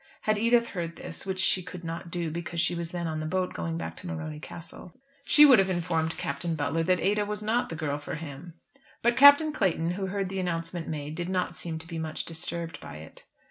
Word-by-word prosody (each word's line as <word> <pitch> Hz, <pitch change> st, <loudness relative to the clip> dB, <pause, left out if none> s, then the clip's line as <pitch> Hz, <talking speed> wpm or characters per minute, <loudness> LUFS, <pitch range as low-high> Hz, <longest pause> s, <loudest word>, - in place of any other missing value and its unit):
Had 215 Hz, -1 st, +1 dB
Edith 235 Hz, +1 st, +3 dB
heard 170 Hz, -3 st, -4 dB
this, 165 Hz, -, -4 dB
which 190 Hz, -1 st, -2 dB
she 185 Hz, 0 st, +4 dB
could 180 Hz, 0 st, -9 dB
not 165 Hz, +1 st, -5 dB
do, 170 Hz, -2 st, -2 dB
because 170 Hz, +1 st, -4 dB
she 175 Hz, -, +2 dB
was 170 Hz, -1 st, -3 dB
then 175 Hz, 0 st, -4 dB
on 160 Hz, -1 st, -2 dB
the 155 Hz, -, -3 dB
boat 185 Hz, +2 st, -1 dB
going 165 Hz, 0 st, -3 dB
back -, -, -5 dB
to 185 Hz, -, -8 dB
Morony 155 Hz, -3 st, -5 dB
Castle, 170 Hz, +5 st, -9 dB, 0.2 s
she 300 Hz, -, +8 dB
would 260 Hz, -7 st, +8 dB
have 190 Hz, 0 st, +3 dB
informed 165 Hz, -2 st, -1 dB
Captain 160 Hz, +4 st, -2 dB
Butler 150 Hz, +2 st, 0 dB
that 180 Hz, +2 st, +2 dB
Ada 210 Hz, +1 st, +2 dB
was 210 Hz, 0 st, -4 dB
not 230 Hz, +3 st, +1 dB
the 165 Hz, -, -4 dB
girl 150 Hz, -2 st, -2 dB
for 145 Hz, -, -5 dB
him; 155 Hz, +2 st, -8 dB, 0.5 s
but 235 Hz, +1 st, +4 dB
Captain 285 Hz, +3 st, +8 dB
Clayton, 175 Hz, -, +1 dB
who 190 Hz, +1 st, -3 dB
heard 195 Hz, 0 st, -2 dB
the 195 Hz, 0 st, -3 dB
announcement 170 Hz, -1 st, -2 dB
made, 150 Hz, -1 st, -4 dB
did 175 Hz, +2 st, -4 dB
not 185 Hz, -1 st, 0 dB
seem 165 Hz, -2 st, -4 dB
to 160 Hz, -, -8 dB
be 165 Hz, -1 st, -5 dB
much 160 Hz, -1 st, -4 dB
disturbed 165 Hz, 0 st, -4 dB
by -, -, -9 dB
it. 80 Hz, +1 st, -12 dB
170 Hz, 230 wpm, -28 LUFS, 160-190 Hz, 0.5 s, she